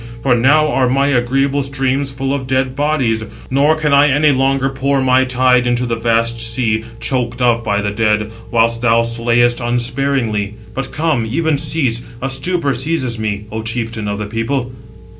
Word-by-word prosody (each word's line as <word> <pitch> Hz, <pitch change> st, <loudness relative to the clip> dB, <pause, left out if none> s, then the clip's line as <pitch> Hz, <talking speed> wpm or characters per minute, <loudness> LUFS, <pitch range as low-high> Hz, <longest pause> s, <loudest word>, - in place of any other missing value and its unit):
For 130 Hz, -, +3 dB
now 145 Hz, +6 st, +3 dB
are 130 Hz, -3 st, +1 dB
my 135 Hz, +2 st, +2 dB
agreeable 135 Hz, +2 st, +1 dB
streams 135 Hz, 0 st, -1 dB
full 135 Hz, 0 st, -3 dB
of 135 Hz, -2 st, -3 dB
dead 130 Hz, 0 st, 0 dB
bodies, 135 Hz, -7 st, 0 dB, 0.3 s
nor 145 Hz, +4 st, +3 dB
can 155 Hz, -2 st, 0 dB
I 145 Hz, +1 st, +5 dB
any 145 Hz, +2 st, +3 dB
longer 135 Hz, 0 st, +1 dB
pour 135 Hz, +1 st, 0 dB
my 130 Hz, 0 st, +3 dB
tide 125 Hz, -1 st, +2 dB
into 120 Hz, +1 st, 0 dB
the 120 Hz, -1 st, -1 dB
vast 115 Hz, 0 st, 0 dB
sea, 115 Hz, -1 st, 0 dB, 0.2 s
choked 125 Hz, -2 st, -2 dB
up 120 Hz, -2 st, +2 dB
by 105 Hz, -1 st, -1 dB
the 105 Hz, -, -1 dB
dead; 105 Hz, 0 st, 0 dB, 0.2 s
whilst 115 Hz, 0 st, +1 dB
thou 115 Hz, -1 st, +3 dB
slayest 120 Hz, +1 st, +1 dB
unsparingly. 120 Hz, -3 st, -1 dB, 0.2 s
But 135 Hz, 0 st, -3 dB
come, 150 Hz, -7 st, 0 dB
even 160 Hz, +2 st, 0 dB
cease—a 125 Hz, -3 st, -2 dB
stupor 140 Hz, +2 st, 0 dB
seizes 130 Hz, -3 st, -2 dB
me—O 105 Hz, +1 st, -4 dB
chieftain 115 Hz, -1 st, -3 dB
of 100 Hz, 0 st, -2 dB
the 105 Hz, -, -4 dB
people." 120 Hz, +4 st, -2 dB
125 Hz, 165 wpm, -16 LUFS, 115-135 Hz, 0.3 s, I